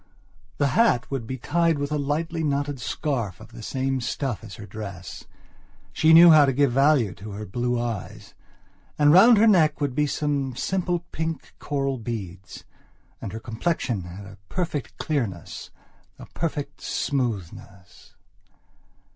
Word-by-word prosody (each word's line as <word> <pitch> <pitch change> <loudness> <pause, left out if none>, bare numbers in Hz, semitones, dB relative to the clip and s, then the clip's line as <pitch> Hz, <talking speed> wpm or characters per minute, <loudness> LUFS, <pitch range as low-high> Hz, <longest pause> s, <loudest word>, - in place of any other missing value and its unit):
The 145 - +2
hat 135 - +2
would 130 -5 -3
be 130 - -4
tied 165 +4 +1
with 145 +1 -3
a 150 - 0
lightly 160 +4 -2
knotted 145 -2 -1
scarf 120 - -3
of 110 - -13
the 120 0 -11
same 130 +3 -2
stuff 120 -1 -3
as 105 -5 -9
her 105 - -9
dress. 100 -3 -8 0.7
She 160 - +4
knew 165 +1 +9
how 155 -2 +8
to 135 - +1
give 140 0 +2
value 135 -5 +3
to 105 +2 -9
her 105 +2 -6
blue 120 +5 -1
eyes. 115 -5 -5 0.6
And 150 0 +5
round 225 +6 +8
her 215 - +5
neck 165 -8 +4
would 145 -3 -1
be 150 +2 +1
some 140 -3 -1
simple 175 +2 -1
pink, 160 -2 -4
coral 135 -3 -2
beads. 100 -5 -7 0.6
And - - -5
her 110 - -6
complexion 115 - -2
had 90 +3 -9
a 95 -1 -13
perfect 155 -9 -3
clearness, 115 - -3 0.5
a - - -10
perfect 145 -3 -4
smoothness... 100 - -4
135 Hz, 150 wpm, -24 LUFS, 110-150 Hz, 0.7 s, knew